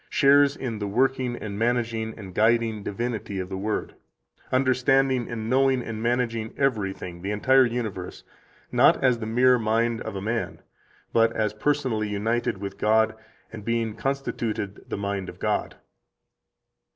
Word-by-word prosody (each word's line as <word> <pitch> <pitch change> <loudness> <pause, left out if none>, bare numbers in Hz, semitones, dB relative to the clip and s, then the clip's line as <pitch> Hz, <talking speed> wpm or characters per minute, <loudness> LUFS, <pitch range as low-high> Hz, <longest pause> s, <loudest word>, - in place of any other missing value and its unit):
shares 140 0 +5
in 115 -5 -4
the 105 - -2
working 130 +3 +1
and 100 -3 -6
managing 115 -1 -1
and 95 -4 -9
guiding 110 +1 +2
divinity 105 -1 -4
of 90 0 -4
the 95 - -4
Word, 105 +3 -3 0.6
understanding 130 -1 +2
and 110 -2 -4
knowing 130 0 +3
and 110 -2 -5
managing 115 -2 -1
everything 95 -9 -1
[the 95 - -4
entire 130 +5 +4
universe], 110 -6 -5 0.5
not - - +5
as 125 -3 +3
the 110 - -4
mere 125 +2 +4
mind 115 +1 +1
of - - -5
a 95 - -4
man, 115 +3 -2 0.5
but 115 0 +4
as 105 -1 0
personally 120 -3 0
united 110 +2 -1
with 100 0 -7
God 110 +1 +3 0.4
and 110 -2 -8
being 115 0 -1
constituted 115 -7 -3
the - - -3
mind 100 -2 -3
of - - -10
God." - - -1
115 Hz, 150 wpm, -25 LUFS, 105-125 Hz, 0.6 s, shares